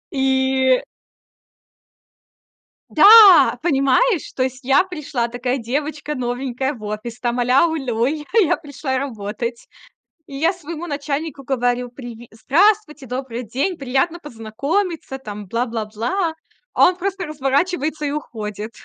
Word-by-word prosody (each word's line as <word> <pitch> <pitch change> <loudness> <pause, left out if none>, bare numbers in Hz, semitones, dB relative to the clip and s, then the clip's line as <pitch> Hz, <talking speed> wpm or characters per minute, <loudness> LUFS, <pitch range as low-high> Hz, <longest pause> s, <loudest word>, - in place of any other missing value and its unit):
И 265 -1 +2 2.1
Да, 420 -3 +8
понимаешь, 320 - +2
то 255 - 0
есть 260 +1 -4
я 270 +8 +4
пришла 300 -9 -3
такая 245 +2 -2
девочка 290 +5 -3
новенькая 255 +2 -2
в 220 -5 -12
офис, 215 +3 -6
там 240 0 -1
аля-улю, 255 -2 +2
я 295 +3 -2 0.2
я 350 - +2
пришла 285 -3 -4
работать. 235 -2 -5 0.6
И 275 - -9
я 325 +6 +1
своему 340 -1 -7
начальнику 290 0 -4
говорю: 245 -1 -1
"Приви 240 -2 -10
здравствуйте, 305 - +1
добрый 250 -1 -5
день, 270 - -2
приятно 275 +5 -1
познакомиться, 285 - -3
там, 210 -5 -8
бла-бла-бла". 230 - -2 0.4
А - - +6
он 365 - +1
просто 385 0 -3
разворачивается 300 +2 -1
и 285 - -1
уходит, 215 -7 -6
270 Hz, 120 wpm, -20 LUFS, 240-310 Hz, 2.1 s, Да